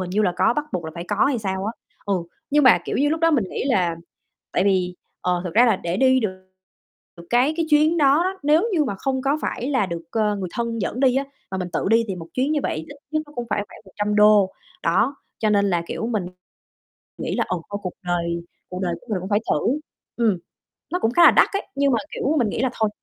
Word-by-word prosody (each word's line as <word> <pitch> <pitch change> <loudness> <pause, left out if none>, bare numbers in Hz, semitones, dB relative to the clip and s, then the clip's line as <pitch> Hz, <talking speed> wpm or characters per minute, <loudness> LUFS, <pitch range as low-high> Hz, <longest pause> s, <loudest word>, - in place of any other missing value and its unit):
hình 180 -1 -4
như 210 +3 +1
là 185 -4 +2
có, - - +3
bắt 300 - 0
buộc 170 -3 -2
là 160 - -5
phải 170 - -6
có 205 0 +2
hay 270 -3 +1
sao 190 -2 -3
á, 220 - -2 0.3
ừ. 200 - +1 0.4
Nhưng 295 -1 +4
mà, 255 - +7
kiểu - - -2
như, 290 +2 +2
lúc 320 +2 -1
đó 330 - +4
mình 270 -9 +2
nghĩ - - -3
là 180 -11 +1 0.6
tại 185 - +2
vì, 185 -2 +1 0.3
ờ, 180 -1 0
thật 180 - -3
ra 240 +3 +6
là 230 - +3
để 170 +1 -3
đi 260 +2 +4
được 185 -4 -2 0.9
cái 250 +5 +3
cái 330 - 0
chuyến 310 +3 +4
đó 285 +2 +5
đó, 380 +1 -2
nếu 305 +5 +4
như 315 -5 +2
mà 225 - -2
không 260 +6 -2
có 280 +3 +1
phải 255 +4 -2
là 255 -8 +2
được, 170 -2 -5
ờ, 210 -2 +1
người 190 -3 -4
thân 235 -1 -2
dẫn 235 +5 -2
đi 260 -2 +4
á 275 - +1 0.3
mà 190 - -3
mình 180 -1 -3
tự - - -1
đi 230 +1 +4
thì 190 - -3
một 165 -2 -8
chuyến 265 +4 +1
như 300 - +1
vậy - - -1
ít 160 - -5 0.3
nhất 310 0 0
nó 295 - -16
cũng 240 -1 -4
phải 205 - +1
khoảng - - -14
$100, 210 0 +3 0.3
đó, 275 - +2 0.2
cho 215 - +1
nên 200 -1 +3
là, 175 -1 +1
kiểu, 225 - -3
mình 215 -6 -1 0.9
nghĩ - - -3
là - - +1
"Ừ, 185 - -1
thôi 205 0 -4
cuộc 180 - -4
đời 170 -1 -1 0.3
cuộc 180 - -5
đời 175 -2 -1
của 245 - -22
mình 200 - 0
cũng 190 - -6
phải 205 0 +3
thử." 275 +5 +1 0.4
Ừm, 220 -6 +2 0.5
nó 360 - 0
cũng 225 - +1
khá 345 +7 +5
là - - +9
đắt - - +5
ấy, 395 - -2
nhưng 280 0 +2
mà, - - +3 0.2
kiểu, 300 - 0
mình 235 -5 +2
nghĩ 225 - -2
là 260 - +2
thôi, 220 -1 0
220 Hz, 260 wpm, -22 LUFS, 190-275 Hz, 0.9 s, là